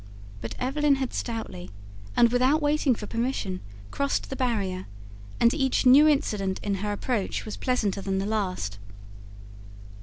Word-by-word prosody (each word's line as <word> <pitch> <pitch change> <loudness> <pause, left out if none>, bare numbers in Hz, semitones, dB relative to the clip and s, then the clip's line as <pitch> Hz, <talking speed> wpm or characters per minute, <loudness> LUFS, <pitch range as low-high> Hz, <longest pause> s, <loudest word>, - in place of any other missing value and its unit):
But 115 - -5
Evelyn 280 +3 +2
had 265 -2 -3
stoutly, 95 - -4 0.5
and 235 -1 +5
without 255 +5 +3
waiting 295 -3 +2
for 215 - -7
permission, 230 -5 -2 0.3
crossed 280 0 -1
the - - -2
barrier; 205 -8 -1 0.5
and 235 0 +5
each 270 -3 +1
new 275 +5 +8
incident 205 -10 +1
in 200 - 0
her 210 0 -1
approach 205 0 -2
was 215 - -5
pleasanter 215 -6 -1
than 195 0 -1
the 195 - -1
last. 185 - -2
235 Hz, 145 wpm, -26 LUFS, 195-265 Hz, 0.5 s, new